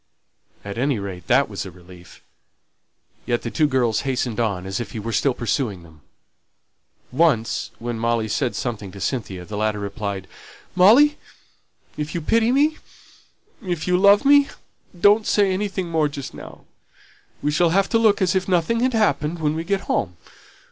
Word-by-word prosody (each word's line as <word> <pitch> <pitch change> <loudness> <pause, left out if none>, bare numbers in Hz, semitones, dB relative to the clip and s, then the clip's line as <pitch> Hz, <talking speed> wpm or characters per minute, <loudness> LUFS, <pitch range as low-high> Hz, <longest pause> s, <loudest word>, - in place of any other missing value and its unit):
At 100 +3 -6
any 135 -1 +1
rate 95 -4 -7
that 135 +3 +3
was 100 -2 -5
a 95 - -8
relief. 90 -1 -16 1.0
Yet 120 -1 0
the 115 - -4
two 150 +9 +2
girls 125 -5 +1
hastened 125 -4 -2
on, 100 -6 -1
as 95 0 -3
if 110 -5 -6
he 110 - -4
was 115 +2 -3
still 135 -3 +1
pursuing 115 - -2
them. 80 -2 -18 1.1
Once, 130 -5 +1
when 120 -1 -5
Molly 115 -1 0
said 120 +4 -1
something 105 -6 -4
to 100 - -10
Cynthia, 95 -6 -4
the 105 +3 -6
latter 105 0 0
replied 100 -1 -5 0.5
"Molly, 245 +11 +6 0.8
if 150 +2 -4
you 170 - -2
pity 225 +8 +2
me 295 +4 +2 0.8
if 175 -5 -4
you 180 - +3
love 200 +4 +5
me 285 0 +6 0.5
don't 210 +3 +4
say 200 -2 +3
anything 195 -1 -2
more 160 -2 +1
just 140 -2 -7
now. - - -12 0.8
We 150 - +1
shall 170 +3 +3
have 195 +3 +2
to 230 - +2
look 215 -3 +3
as 180 - +2
if 185 -1 0
nothing 185 +5 +1
had 255 +1 +1
happened 175 -7 +1
when 155 -2 0
we 160 +1 -3
get 195 +2 -1
home. 90 0 -2
140 Hz, 170 wpm, -22 LUFS, -, 1.1 s, Molly